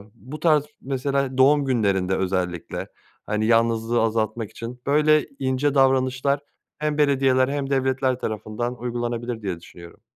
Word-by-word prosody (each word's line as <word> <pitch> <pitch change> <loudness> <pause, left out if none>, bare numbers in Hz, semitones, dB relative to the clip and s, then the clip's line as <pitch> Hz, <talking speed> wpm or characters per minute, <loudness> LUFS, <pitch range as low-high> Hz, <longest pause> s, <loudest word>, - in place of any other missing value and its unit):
bu 130 +9 -9
tarz 155 -2 +3 0.2
mesela 135 0 -1
doğum 140 +2 +5
günlerinde 100 -7 +1
özellikle, 90 -2 -2 0.4
hani, 105 +1 -1
yalnızlığı 115 0 +2
azaltmak 110 0 -1
için 120 +2 -8
böyle 150 +1 +4
ince 135 +2 0
davranışlar 135 +1 +2 0.4
hem 150 0 -1
belediyeler 135 -3 +3
hem 140 -1 -2
devletler 130 -1 +1
tarafından 110 +3 -3
uygulanabilir 120 -1 -3
diye 95 -4 -4
düşünüyorum. 85 0 -14
130 Hz, 125 wpm, -23 LUFS, 110-140 Hz, 0.4 s, doğum